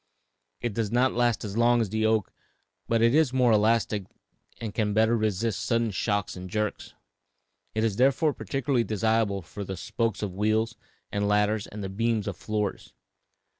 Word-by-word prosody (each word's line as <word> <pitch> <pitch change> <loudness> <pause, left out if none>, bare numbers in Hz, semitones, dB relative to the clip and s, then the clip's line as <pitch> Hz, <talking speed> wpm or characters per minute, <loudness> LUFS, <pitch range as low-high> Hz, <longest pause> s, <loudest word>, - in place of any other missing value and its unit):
It 120 - -2
does 110 -1 -2
not 125 +2 +3
last 120 -2 +1
so 105 - -4
long 120 +3 +3
as 110 -4 0
the 110 0 +1
oak, 110 -3 0 0.5
but 115 0 +2
it 115 +1 +4
is 155 -3 +4
more 125 -2 +4
elastic 110 -1 +2 0.5
and 110 -3 -5
can 105 -2 0
better 110 +2 +4
resist 110 -1 -1
sudden 115 -2 +1
shocks 100 0 -1
and 90 0 -8
jerks; 105 +1 -3 0.8
it 110 - +1
is 110 -3 0
therefore 140 +4 +3
particularly 125 +3 -1
desirable 110 -2 0
for 100 +4 -7
the 95 -1 -5
spokes 110 +1 -2
of 100 -3 -3
wheels 110 +3 0 0.4
and 100 0 0
ladders 105 +1 +1
and 105 0 -7
the - - -2
beams 110 +1 0
of 100 - -3
floors. 105 +1 -3
110 Hz, 170 wpm, -27 LUFS, 105-115 Hz, 0.8 s, it